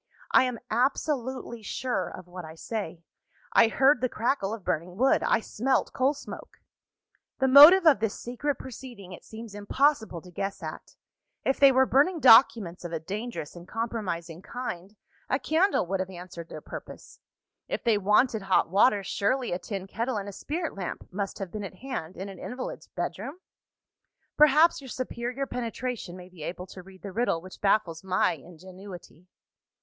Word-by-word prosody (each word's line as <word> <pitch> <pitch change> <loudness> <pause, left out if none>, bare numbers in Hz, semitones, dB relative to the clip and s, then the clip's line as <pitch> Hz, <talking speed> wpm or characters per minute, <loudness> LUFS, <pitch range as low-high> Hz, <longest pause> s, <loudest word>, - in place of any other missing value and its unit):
I - - +6
am 250 -2 -3
absolutely 255 -1 -1
sure 245 +4 -2
of 180 - -10
what 180 0 -8
I 160 0 -10
say: 175 -3 -5 0.5
I - - +7
heard 265 +3 +3
the 255 - +1
crackle 225 -3 -1
of 225 -3 -6
burning 175 +3 -2
wood 265 +4 +3
I 225 - +2
smelt 260 +5 0
coal 270 +3 +2
smoke. - - -10 0.8
"The 265 - +2
motive 300 +8 +10
of 305 -10 +6
this 225 -1 -2
secret 270 +4 -2
proceeding 240 -7 -10
it 180 - -10
seems 220 -1 -10
impossible 220 - +1
to 180 - -13
guess 195 +1 -4
at. 155 -1 -8 0.5
If 270 - +1
they 275 -1 +8
were 265 0 +4
burning 300 +7 +3
documents 225 - +6
of 175 - -6
a 165 - -2
dangerous 200 -1 -6
and 175 0 -11
compromising 190 -7 -4
kind, 200 -5 -6 0.3
a 260 - +2
candle 320 - +2
would 190 +2 -2
have 185 0 -2
answered 175 -2 -9
their - - -8
purpose. - - -10 0.5
If - - -3
they 225 -3 +3
wanted 210 +3 +3
hot 190 -4 +2
water, 205 +1 +4
surely 245 +7 0
a 175 - -1
tin 195 -2 -5
kettle 230 +4 -2
and 200 -1 -4
a - - -5
spirit 320 - -4
lamp 190 -3 -6
must 195 +1 -4
have 195 -3 -6
been 210 -1 -5
at 195 -1 -7
hand 190 -8 -6
in 190 - -5
an 195 - -10
invalid's - - -6
bedroom? 290 +5 -5 1.0
Perhaps, 300 +2 +5
your 265 - -10
superior 250 +2 -3
penetration 240 -6 -4
may 180 -1 -11
be 180 -3 -15
able 180 +4 -5
to 185 - -11
read 190 +1 -16
the 200 - -6
riddle 230 -5 +1
which 185 +2 -13
baffles 190 -5 +1
my 185 -1 +2
ingenuity. 180 +2 -11
215 Hz, 175 wpm, -27 LUFS, 185-260 Hz, 1.0 s, motive